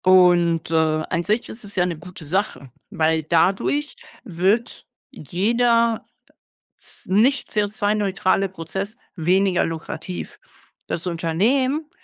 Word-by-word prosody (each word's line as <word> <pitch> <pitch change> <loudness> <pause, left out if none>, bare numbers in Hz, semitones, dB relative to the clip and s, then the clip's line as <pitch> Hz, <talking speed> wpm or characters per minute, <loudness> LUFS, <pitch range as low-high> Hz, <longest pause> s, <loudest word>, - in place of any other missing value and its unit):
Und, 175 -3 +4
äh, - - -1
an 160 +1 +1
sich 215 +6 0
ist 230 - -9
es 205 -1 -10
ja 180 -2 +3
'ne 175 -3 -3
gute 175 0 -11
Sache, 165 - -2 0.2
weil 160 0 +1
dadurch 195 - +1 0.3
wird 200 +3 -1 0.2
jeder 230 - +1 0.7
z - - -9
nicht 235 +9 +3
CO₂-neutrale 205 -2 +1
Prozess 190 +4 -5 0.2
weniger 185 +2 +2
lukrativ. 165 +2 -6 0.5
Das 170 - -3
Unternehmen 240 - 0
185 Hz, 110 wpm, -22 LUFS, 165-215 Hz, 0.7 s, Und